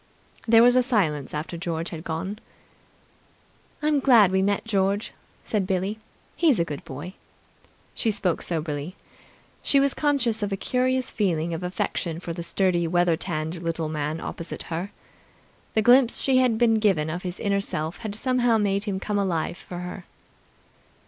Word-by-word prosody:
There 225 0 +7
was 245 +1 +6
a 255 - +6
silence 185 - 0
after 155 +3 -4
George 165 -1 -3
had 160 -1 -7
gone. 185 +6 -4 1.4
"I'm 300 -1 +3
glad 235 -8 +6
we 190 0 +2
met 200 +2 0
George," 200 -1 0 0.3
said 205 -4 -1
Billie. 190 +3 -1 0.4
"He's 310 -9 +3
a 170 - +1
good 145 -4 -6
boy." 145 +8 -8 0.8
She 225 - 0
spoke 200 -5 0
soberly. 155 0 -2 0.7
She 280 - +4
was 275 0 +3
conscious 260 -7 +1
of 205 -1 -1
a 195 - -1
curious 255 +3 0
feeling 170 -5 0
of 165 - -4
affection 175 -2 -2
for 170 -1 -5
the 170 - -5
sturdy, 175 0 +1
weather 175 0 +3
tanned 160 -1 -3
little 165 -2 -2
man 155 +1 -2
opposite 165 0 -6
her. 175 +5 -3 0.9
The 220 - +3
glimpse 245 +1 +5
she 265 -1 +2
had 250 -3 +3
been 225 -1 +3
given 190 -8 +2
of 175 +3 -4
his 180 -1 -5
inner 200 -2 +1
self 160 -2 -3
had 215 -3 -5
somehow 245 0 +2
made 200 -1 0
him 195 -3 -2
come 205 +1 -1
alive 180 -3 -1
for 180 - -9
her. 180 +1 -7
190 Hz, 165 wpm, -25 LUFS, 170-225 Hz, 1.4 s, There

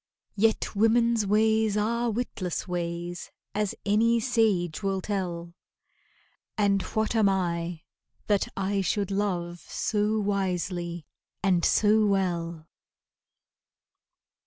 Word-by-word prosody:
Yet 220 +1 +1
women's 225 0 +3
ways 220 0 +3
are 235 +3 0
witless 210 -6 -3
ways, 175 0 -4 0.2
As 210 -1 -1
any 225 +3 +3
sage 215 -9 +1
will 195 -1 0
tell, 175 -4 -3 1.0
And 200 -2 +3
what 220 +3 -1
am 215 -3 +4
I, 170 -3 -2 0.4
that 205 -2 +1
I 195 +1 0
should 200 +1 -1
love 180 -4 -1
So 215 0 0
wisely 180 -4 -2 0.4
and 180 -3 +2
so 215 0 +4
well? 170 -4 -1
200 Hz, 100 wpm, -27 LUFS, 175-215 Hz, 1.0 s, am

